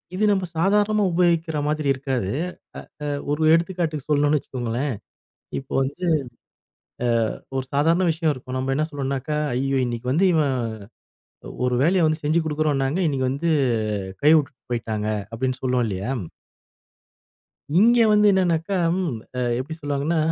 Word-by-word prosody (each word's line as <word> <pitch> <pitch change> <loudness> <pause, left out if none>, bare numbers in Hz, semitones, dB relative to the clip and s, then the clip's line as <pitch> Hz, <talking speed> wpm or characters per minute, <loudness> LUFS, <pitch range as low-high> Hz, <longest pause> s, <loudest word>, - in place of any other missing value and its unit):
இது 210 - -1
நம்ம 190 -2 +1
சாதாரணமா 205 +3 +2
உபயோகிக்ற 170 -3 +2
மாதிரி 150 -1 -1
இருக்காது. 130 -7 -2 0.7
அ - - -2 0.3
ஒரு 155 +2 -1
எடுத்துக்காட்டுக்கு 165 -4 -1
சொல்லணும்னு 145 +1 +3
வச்சுக்கோங்களேன், 125 +1 -3 0.7
இப்போ 135 - -14
வந்து 145 +7 -5 1.4
அ - - -23 0.2
ஒரு 130 - -3
சாதாரண 165 +5 +3
விஷயம் 160 -1 0
இருக்கும் 130 0 -6
நம்ம 135 +1 -1
என்ன 155 +1 +1
சொல்லணும்னாக்கா, 140 +1 -2 0.2
"ஐயோ! 135 +1 0
இன்னிக்கு 120 +1 -3
வந்து 185 +6 +3
இவன் 140 -4 +2 1.1
ஒரு 125 - +1
வேலைய 180 +2 +3
வந்து 155 +1 -1
செஞ்சு 155 +3 +2
குடுக்குறோம்னாங்க, 150 0 0
இன்னைக்கு 130 -3 0
வந்து 160 +5 -1 0.7
கை 150 - +7
விட்டுட்டு 140 -5 -4
போயிட்டாங்க." 110 -2 -2 0.3
அப்டின்னு 130 +2 -2
சொல்லுவோம் 125 -2 +1
இல்லையா. 100 +3 -3 1.7
இங்கே 235 +3 +6
வந்து 210 0 +5
என்னனாக்கா 180 0 +1 0.8
எப்டி 150 +5 -5
சொல்வாங்கன்னா, 145 +2 -1
150 Hz, 125 wpm, -23 LUFS, 130-170 Hz, 1.7 s, கை